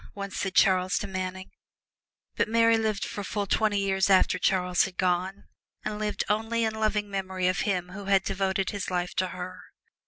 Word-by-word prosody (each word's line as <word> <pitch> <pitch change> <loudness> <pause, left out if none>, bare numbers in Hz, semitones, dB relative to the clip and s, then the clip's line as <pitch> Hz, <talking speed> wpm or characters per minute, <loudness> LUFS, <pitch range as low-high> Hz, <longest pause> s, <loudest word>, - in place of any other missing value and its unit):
once 200 -1 -6
said 190 -1 -3
Charles 185 0 +4
to - - -2
Manning. 185 -1 -5 0.8
But - - +1
Mary 230 0 +4
lived 220 -2 0
for 205 - -5
full 205 +1 -2
twenty 210 +1 +1
years 195 -1 +1
after 185 -1 +4
Charles 180 -1 +2
had 190 -2 -8
gone, 185 +2 0 0.4
and 210 0 -3
lived 210 -1 -1
only 225 +2 0
in 220 -1 0
loving 215 -1 0
memory 190 -2 -2
of 185 +1 +1
him 180 -4 -1
who 195 +2 -8
had 195 -1 +3
devoted 190 0 -1
his 200 -2 -4
life 180 -1 -2
to 185 - +2
her. 180 0 -7
195 Hz, 185 wpm, -27 LUFS, 185-210 Hz, 0.8 s, Charles